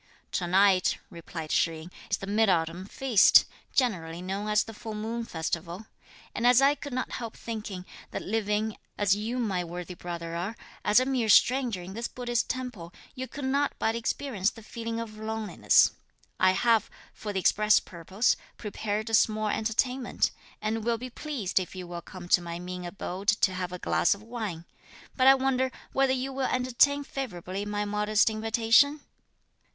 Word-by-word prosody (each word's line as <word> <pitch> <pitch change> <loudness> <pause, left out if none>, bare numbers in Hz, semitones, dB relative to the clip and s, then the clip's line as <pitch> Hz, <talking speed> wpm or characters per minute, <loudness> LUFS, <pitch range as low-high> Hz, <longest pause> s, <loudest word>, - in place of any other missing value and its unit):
"Tonight," 185 +1 +3
replied 165 -1 -7
Shih 165 -1 +1
yin, 170 +3 -11 0.2
"is 200 - +1
the - - -7
mid 210 +2 +2
autumn 170 +1 0
feast, 245 -3 +5 0.3
generally 170 -10 0
known 195 +3 -4
as 210 -1 +3
the 225 - -10
full 220 0 -7
moon 225 +2 -3
festival; 170 +2 -4 0.5
and 235 - +1
as 245 0 +7
I 275 +1 +5
could 285 0 -8
not 255 0 -3
help 230 -3 -6
thinking 210 -5 -6 0.2
that - - -5
living, 210 0 -1 0.2
as 200 -1 +3
you 220 +4 -3
my 200 -7 0
worthy 175 +1 -6
brother 170 -1 -6
are, 185 +7 -3 0.3
as 210 +3 +5
a 255 - +1
mere 255 -4 0
stranger 240 -5 +4
in 185 +2 -8
this 230 +3 -3
Buddhist 240 -2 -2
temple, 245 -10 -5 0.2
you 260 -1 -5
could 280 +1 -6
not 280 +2 +1
but 225 - +1
experience 230 -3 -1
the 225 - -13
feeling 230 +1 -5
of 215 -2 -7
loneliness. 220 -1 +3 0.5
I 185 0 +5
have, 230 +2 +3 0.2
for 210 - -6
the 195 - -1
express 210 +3 +4
purpose, 190 +6 0 0.2
prepared 210 0 -3
a - - -7
small 215 0 +3
entertainment, 245 +4 0 0.3
and 220 +1 -1
will 235 0 +1
be 250 +2 -7
pleased 250 -11 -1
if 185 0 -6
you 185 -1 -6
will 175 0 -6
come 180 0 -10
to 180 - +5
my 170 -1 -5
mean 180 0 -6
abode 185 +2 -6
to 210 -3 +3
have 180 -1 -3
a 180 - -5
glass 180 - +2
of 200 - -14
wine. 215 -8 -5 0.5
But 260 -1 +4
I 270 - +9
wonder 260 -1 +1 0.2
whether 270 -1 +3
you 265 +1 -2
will 265 0 0
entertain 255 +3 +2
favourably 200 -8 -5
my 205 0 -2
modest 210 +1 +2
invitation?" 225 +6 +3
215 Hz, 175 wpm, -28 LUFS, 185-240 Hz, 0.5 s, I